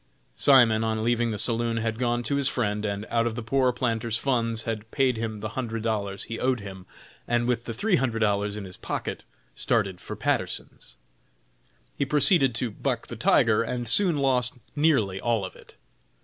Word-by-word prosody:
Simon, 115 Hz, -, +5 dB
on 110 Hz, 0 st, -1 dB
leaving 120 Hz, 0 st, +1 dB
the 110 Hz, -, -3 dB
saloon, 115 Hz, +1 st, +1 dB
had 110 Hz, 0 st, -2 dB
gone 120 Hz, -1 st, 0 dB
to 140 Hz, +5 st, -1 dB
his 140 Hz, -1 st, +2 dB
friend 105 Hz, -3 st, -1 dB
and, 100 Hz, 0 st, -3 dB
out 115 Hz, 0 st, +2 dB
of 115 Hz, -, -3 dB
the 120 Hz, -, -5 dB
poor 130 Hz, +2 st, +2 dB
planter's 115 Hz, -2 st, -1 dB
funds, 115 Hz, -4 st, -1 dB
had 110 Hz, -1 st, -4 dB
paid 130 Hz, -2 st, +1 dB
him 110 Hz, -2 st, -4 dB
the 110 Hz, -, -3 dB
hundred 115 Hz, -1 st, -4 dB
dollars 100 Hz, -3 st, -2 dB
he 115 Hz, 0 st, -6 dB
owed 130 Hz, -1 st, +1 dB
him, 95 Hz, -2 st, -10 dB, 0.4 s
and, 120 Hz, 0 st, +1 dB
with 120 Hz, -1 st, -1 dB
the -, -, -4 dB
three 200 Hz, -, +2 dB
hundred 125 Hz, -5 st, -1 dB
dollars 105 Hz, -1 st, 0 dB
in 105 Hz, -, -6 dB
his 90 Hz, -1 st, -8 dB
pocket, -, -, -5 dB, 0.3 s
started 100 Hz, -6 st, -1 dB
for -, -, -7 dB
Patterson's. -, -, -3 dB, 1.0 s
He -, -, 0 dB
proceeded 140 Hz, -, +4 dB
to 120 Hz, -1 st, -1 dB
"buck -, -, -3 dB
the -, -, -6 dB
tiger," 110 Hz, -1 st, +3 dB
and 120 Hz, +1 st, -3 dB
soon 175 Hz, -, +3 dB
lost 130 Hz, -2 st, +1 dB, 0.2 s
nearly 125 Hz, -11 st, +2 dB
all 115 Hz, -4 st, 0 dB
of 95 Hz, -, -9 dB
it. -, -, -17 dB
115 Hz, 190 wpm, -26 LUFS, 110-125 Hz, 1.0 s, Simon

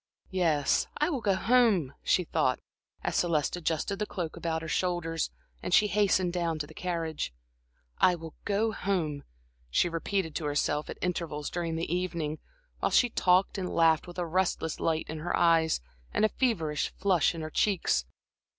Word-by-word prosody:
"Yes, 165 Hz, -6 st, +2 dB
I 300 Hz, +4 st, +1 dB
will 270 Hz, -6 st, -2 dB
go 200 Hz, -3 st, +2 dB
home," 215 Hz, -, +3 dB
she 180 Hz, -, +2 dB
thought, 155 Hz, -6 st, +1 dB, 0.4 s
as -, -, -1 dB
Celeste 165 Hz, -4 st, +1 dB
adjusted 175 Hz, +4 st, -1 dB
the 210 Hz, -, -1 dB
cloak 170 Hz, -5 st, -4 dB
about 165 Hz, -1 st, -2 dB
her -, -, -5 dB
shoulders 165 Hz, -1 st, -1 dB, 0.3 s
and 180 Hz, -, +2 dB
she 210 Hz, -, +6 dB
hastened 195 Hz, -3 st, +2 dB
down 170 Hz, -3 st, -1 dB
to 150 Hz, -, -3 dB
the -, -, -14 dB
carriage. 165 Hz, -, -3 dB, 0.7 s
"I 180 Hz, -, +5 dB
will 165 Hz, -2 st, -9 dB
go 210 Hz, +2 st, +1 dB
home," 170 Hz, -9 st, -1 dB, 0.5 s
she 175 Hz, -, +2 dB
repeated 165 Hz, 0 st, -2 dB
to 160 Hz, -, -4 dB
herself 145 Hz, 0 st, 0 dB
at -, -, -6 dB
intervals 165 Hz, -5 st, -2 dB
during 170 Hz, -2 st, -2 dB
the 165 Hz, 0 st, -2 dB
evening, 170 Hz, -4 st, -2 dB, 0.4 s
while -, -, +1 dB
she 245 Hz, -, +4 dB
talked 185 Hz, +1 st, +3 dB
and 180 Hz, -1 st, -2 dB
laughed 165 Hz, 0 st, +3 dB
with 175 Hz, -, -10 dB
a 175 Hz, -, -1 dB
restless 170 Hz, -2 st, 0 dB
light 160 Hz, -1 st, 0 dB
in 155 Hz, 0 st, -5 dB
her 175 Hz, +3 st, -1 dB
eyes 165 Hz, -, +3 dB, 0.3 s
and 215 Hz, -, +2 dB
a -, -, +3 dB
feverish 165 Hz, -, 0 dB
flush 180 Hz, -4 st, +2 dB
on 165 Hz, -, -5 dB
her 155 Hz, 0 st, -5 dB
cheeks. 185 Hz, -, +1 dB
170 Hz, 175 wpm, -29 LUFS, 160-185 Hz, 0.7 s, she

